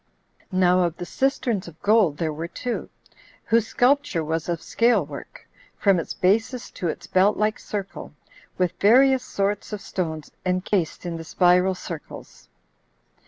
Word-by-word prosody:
10. 185 Hz, -, -2 dB
Now 180 Hz, 0 st, +4 dB
of 170 Hz, -1 st, -3 dB
the 175 Hz, -, -5 dB
cisterns 240 Hz, -5 st, -1 dB
of 170 Hz, -1 st, -12 dB
gold 200 Hz, -8 st, +4 dB
there 160 Hz, -2 st, -1 dB
were 160 Hz, +3 st, -5 dB
two, 245 Hz, +7 st, -4 dB, 0.5 s
whose 225 Hz, -1 st, +2 dB
sculpture 255 Hz, -, +2 dB
was 160 Hz, +2 st, -2 dB
of 170 Hz, -1 st, -1 dB
scale 230 Hz, -2 st, +2 dB
work, 145 Hz, -1 st, -10 dB, 0.3 s
from 195 Hz, -3 st, +3 dB
its 165 Hz, -, -5 dB
basis 225 Hz, +6 st, 0 dB
to 175 Hz, -, -4 dB
its 160 Hz, -, -4 dB
belt 195 Hz, +3 st, +3 dB
like 215 Hz, +1 st, 0 dB
circle, 200 Hz, -2 st, -6 dB, 0.5 s
with 180 Hz, -1 st, +1 dB
various 260 Hz, +5 st, +5 dB
sorts 200 Hz, +1 st, -2 dB
of 210 Hz, -, -4 dB
stones 160 Hz, -6 st, -4 dB
enchased 185 Hz, -1 st, -1 dB
in 170 Hz, -1 st, -3 dB
the 165 Hz, -, -7 dB
spiral 180 Hz, +2 st, +3 dB
circles. 165 Hz, -3 st, -9 dB
185 Hz, 155 wpm, -24 LUFS, 170-215 Hz, 0.5 s, various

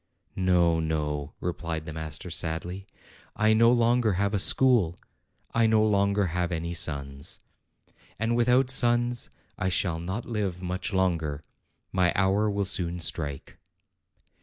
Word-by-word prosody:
"No, 90 Hz, -3 st, +2 dB
no," 75 Hz, -2 st, -3 dB
replied 85 Hz, -2 st, -4 dB
the 80 Hz, -, -7 dB
master 80 Hz, +2 st, -6 dB
sadly; 85 Hz, +4 st, -3 dB, 0.5 s
"I 110 Hz, +1 st, +3 dB
no 115 Hz, +2 st, +5 dB
longer 120 Hz, -2 st, +2 dB
have 100 Hz, +3 st, 0 dB
a 100 Hz, -, +1 dB
school; 115 Hz, -6 st, +4 dB, 0.6 s
I 115 Hz, -1 st, +3 dB
no 110 Hz, -1 st, +3 dB
longer 100 Hz, -1 st, +2 dB
have 90 Hz, 0 st, -1 dB
any 85 Hz, 0 st, -3 dB
sons. 70 Hz, -2 st, -4 dB, 0.8 s
And 115 Hz, +2 st, 0 dB
with 120 Hz, 0 st, +2 dB
out 125 Hz, +1 st, +3 dB
sons, 120 Hz, -1 st, +3 dB, 0.3 s
I 95 Hz, -, 0 dB
shall 85 Hz, -2 st, 0 dB
not 95 Hz, +7 st, -4 dB
live 100 Hz, -6 st, -3 dB
much 90 Hz, +3 st, -3 dB
longer. 85 Hz, -6 st, -1 dB, 0.5 s
My 90 Hz, -2 st, +2 dB
hour 95 Hz, +3 st, +2 dB
will 100 Hz, -1 st, -1 dB
soon 90 Hz, -2 st, -1 dB
strike." 75 Hz, -4 st, -3 dB
95 Hz, 135 wpm, -27 LUFS, 80-110 Hz, 0.8 s, no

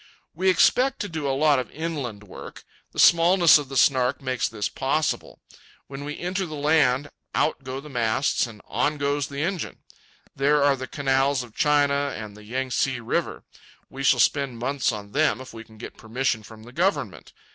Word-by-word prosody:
We 185 Hz, +4 st, +1 dB
expect 255 Hz, +8 st, +3 dB
to 205 Hz, -, -2 dB
do 160 Hz, -5 st, -4 dB
a 135 Hz, -, 0 dB
lot 150 Hz, -2 st, +4 dB
of 125 Hz, -, -5 dB
inland 145 Hz, -10 st, -5 dB
work. 100 Hz, -, -11 dB, 0.3 s
The -, -, -16 dB
smallness 170 Hz, -1 st, +6 dB
of 140 Hz, -2 st, -7 dB
the 135 Hz, -, -4 dB
Snark 130 Hz, -1 st, +3 dB
makes 130 Hz, -2 st, -1 dB
this 105 Hz, -3 st, -3 dB
possible. 140 Hz, +7 st, -2 dB, 0.4 s
When 135 Hz, +1 st, -8 dB
we 150 Hz, +1 st, -6 dB
enter 185 Hz, +1 st, -3 dB
the 155 Hz, -, -7 dB
land, 145 Hz, -2 st, +2 dB, 0.2 s
out 150 Hz, -2 st, 0 dB
go 130 Hz, +1 st, -5 dB
the 145 Hz, -, -11 dB
masts 120 Hz, -1 st, 0 dB
and 110 Hz, -3 st, -13 dB
on 145 Hz, +7 st, -1 dB
goes 145 Hz, -1 st, -1 dB
the 140 Hz, +1 st, -4 dB
engine. 185 Hz, 0 st, -4 dB, 0.5 s
There 145 Hz, +1 st, +2 dB
are 140 Hz, -1 st, +4 dB
the 130 Hz, -1 st, -7 dB
canals 135 Hz, -1 st, +1 dB
of 120 Hz, -3 st, -14 dB
China, 145 Hz, -1 st, +2 dB
and 105 Hz, -2 st, -8 dB
the 105 Hz, -, -14 dB
Yang 130 Hz, +4 st, -4 dB
tse 130 Hz, 0 st, 0 dB
River. 115 Hz, -, -2 dB, 0.5 s
We 135 Hz, -, -7 dB
shall 130 Hz, -2 st, +4 dB
spend 135 Hz, -1 st, +1 dB
months 135 Hz, +3 st, 0 dB
on 100 Hz, -2 st, -8 dB
them 155 Hz, +2 st, +1 dB
if 130 Hz, -2 st, -10 dB
we 115 Hz, 0 st, -9 dB
can 110 Hz, -1 st, -18 dB
get -, -, -10 dB
permission 115 Hz, 0 st, -2 dB
from 110 Hz, +1 st, -13 dB
the 120 Hz, +2 st, -13 dB
government. 185 Hz, +7 st, -1 dB
135 Hz, 190 wpm, -24 LUFS, 125-150 Hz, 0.5 s, smallness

